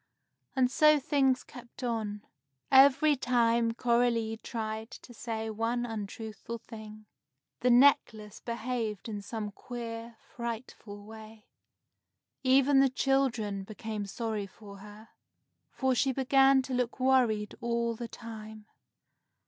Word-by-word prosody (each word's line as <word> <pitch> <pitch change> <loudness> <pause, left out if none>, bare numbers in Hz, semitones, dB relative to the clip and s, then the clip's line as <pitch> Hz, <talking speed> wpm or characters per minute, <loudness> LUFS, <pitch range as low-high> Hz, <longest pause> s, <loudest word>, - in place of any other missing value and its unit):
And 255 -1 +3
so 305 +1 +5
things 270 -3 +2
kept 245 0 -12
on. 215 -4 -3 0.5
Every 280 +3 +6
time 235 -2 +2
Coralie 235 -2 +1
tried 220 -1 -5
to 245 - -12
say 225 -1 -4
one 230 +3 -1
untruthful 220 0 -6
thing, 215 -2 -11 0.5
the 250 - +2
necklace 240 -5 +3
behaved 230 -3 -3
in 210 -2 -5
some 210 +1 -5
queer, 230 +1 -7
frightful 230 -4 -7
way. 220 0 -12 1.0
Even 270 +1 +4
the 270 0 +5
children 245 -7 0
became 215 0 -5
sorry 215 0 -3
for 200 0 -13
her, 210 +2 -13 0.6
for 265 -1 0
she 265 +2 +2
began 270 0 +4
to 260 - -5
look 250 0 -1
worried 245 -5 +2
all 235 0 0
the 235 +1 -6
time. 220 -2 -10
230 Hz, 115 wpm, -30 LUFS, 215-255 Hz, 1.0 s, Every